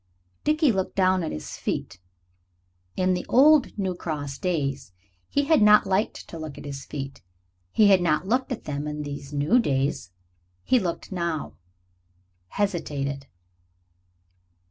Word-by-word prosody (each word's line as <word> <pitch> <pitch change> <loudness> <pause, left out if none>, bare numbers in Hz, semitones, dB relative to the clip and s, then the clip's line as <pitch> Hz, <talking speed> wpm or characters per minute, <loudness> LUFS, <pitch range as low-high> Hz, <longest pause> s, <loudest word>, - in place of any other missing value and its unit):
Dickie 305 -2 +3
looked 190 -3 -2
down 185 -1 +3
at 160 - -3
his 75 - -6
feet. 90 - -4 1.0
In 185 0 +2
the 180 - -2
old 285 0 +5
New 190 -2 -1
Cross 145 -5 -5
days 140 - -2 0.4
he 285 - +1
had 305 -2 +3
not 210 0 +7
liked 195 +3 -1
to 165 - -8
look 155 -3 -7
at - - -9
his 140 -1 -6
feet. 135 -2 -6 0.5
He 215 - +4
had 190 -2 +6
not 165 0 +1
looked 255 +6 0
at 250 - -4
them 145 0 -4
in 150 0 -4
these 140 -1 -7
new 145 +12 +3
days. 135 - 0
Now 90 - -44 0.5
he 255 - +3
looked. 180 -1 -4 1.3
Hesitated. 140 - -2
175 Hz, 145 wpm, -25 LUFS, 140-210 Hz, 1.3 s, not